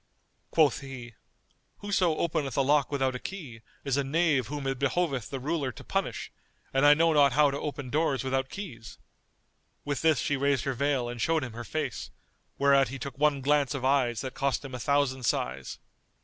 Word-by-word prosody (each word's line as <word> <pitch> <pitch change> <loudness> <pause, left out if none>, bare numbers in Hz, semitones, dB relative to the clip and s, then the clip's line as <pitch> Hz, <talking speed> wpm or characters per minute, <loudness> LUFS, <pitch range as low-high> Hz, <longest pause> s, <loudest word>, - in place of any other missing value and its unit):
Quoth 155 -3 +3
he, 130 -4 -9 0.7
"Whoso 190 -5 +1
openeth 155 -6 -1
a 135 - +4
lock 140 0 +2
without 135 -2 0
a 125 - -5
key 140 -13 -8 0.2
is 135 -1 0
a 140 - +1
knave 145 -3 +1
whom 145 +1 -5
it 135 -1 -2
behoveth 140 -4 0
the 135 - -4
ruler 145 -1 -1
to - - -12
punish, - - -3 0.4
and 135 +2 +4
I 145 - +8
know 165 +1 +3
not 140 -3 +5
how 145 +1 +4
to 140 - -3
open 145 -4 -5
doors 145 -4 +1
without 130 0 -1
keys?"[FN#230] 130 - -8 0.9
With 145 -1 -2
this 160 -3 +4
she 145 +4 0
raised 140 -2 +1
her 135 - -1
veil 135 -1 0
and 120 -1 -5
showed 160 +1 +1
him 120 -3 -6
her 120 +1 -6
face, 145 -1 -4 0.5
whereat 140 -1 +4
he 135 - -6
took 135 0 -7
one 150 -2 +2
glance 145 0 +2
of 130 -2 -3
eyes 130 -4 +2
that 130 -1 -5
cost 140 0 -1
him 135 - -8
a 125 - -4
thousand 140 0 +1
sighs. 65 - -2
140 Hz, 195 wpm, -28 LUFS, 130-150 Hz, 0.9 s, I